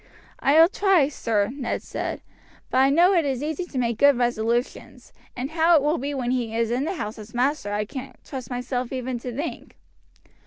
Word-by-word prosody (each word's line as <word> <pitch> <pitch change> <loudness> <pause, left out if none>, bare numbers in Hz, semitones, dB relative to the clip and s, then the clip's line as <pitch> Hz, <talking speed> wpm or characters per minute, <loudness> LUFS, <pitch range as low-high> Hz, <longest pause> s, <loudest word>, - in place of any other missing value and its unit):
"I 290 +3 +4
will 330 - +9
try, 380 -7 +3
sir," 220 -6 0
Ned 270 -4 -3
said; - - -4 0.5
"but 255 - +2
I 265 +1 +5
know 345 +7 +5
it 340 -3 +3
is 270 -2 -2
easy 315 +3 -3
to 290 - -8
make 235 -3 -1
good 285 -2 +6
resolutions, 240 0 -2 0.2
and 255 +4 -4
how 330 +1 +4
it 295 - +4
will 300 +3 +1
be 285 +2 -3
when 250 -2 -1
he 235 -3 -1
is 230 0 0
in 255 +4 0
the 375 - -2
house 215 -8 -5
as 215 +2 -11
master 255 -3 0
I 210 +1 -1
can't 265 +4 -8
trust 260 -5 -7
myself 250 0 -3
even 255 -2 -3
to 250 +1 -6
think." 290 +7 -6
260 Hz, 205 wpm, -24 LUFS, 240-295 Hz, 0.5 s, will